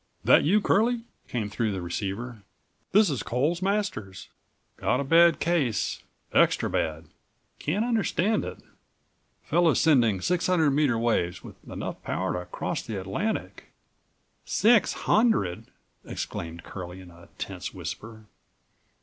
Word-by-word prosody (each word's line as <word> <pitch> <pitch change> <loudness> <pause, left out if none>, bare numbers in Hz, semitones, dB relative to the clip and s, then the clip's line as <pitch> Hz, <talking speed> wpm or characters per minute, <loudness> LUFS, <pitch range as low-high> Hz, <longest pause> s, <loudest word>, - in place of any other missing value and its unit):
That - - +6
you, 200 +8 +3
Curlie?" 230 +4 +2 0.2
came 115 -4 -2
through 105 0 -1
the 95 - -3
receiver. 105 +6 -4 0.5
"This 205 -4 +5
is 135 - -2
Coles 145 +9 0
Masters. 190 - -2 0.5
Got 125 - +1
a - - 0
bad23 165 +3 +5
case—extra 150 - 0
bad. 80 +1 -1 0.5
Can't 195 +10 0
understand 220 -3 +1
it. - - -6 0.9
Fellow's 170 -2 +3
sending 120 - +4
600 175 - +2
meter 140 -4 +2
waves, 105 -7 0
with - - -13
enough - - -5
power - - -2
to 90 0 -4
cross - - -3
the 105 -3 -5
Atlantic." 100 - -3 0.8
"Six 230 +1 +3
hundred!" 210 - +2 0.4
exclaimed 85 0 -6
Curlie 90 -1 -8
in 90 -1 -13
a 85 0 -16
tense - - -5
whisper. 110 0 -8
130 Hz, 125 wpm, -27 LUFS, -, 0.9 s, That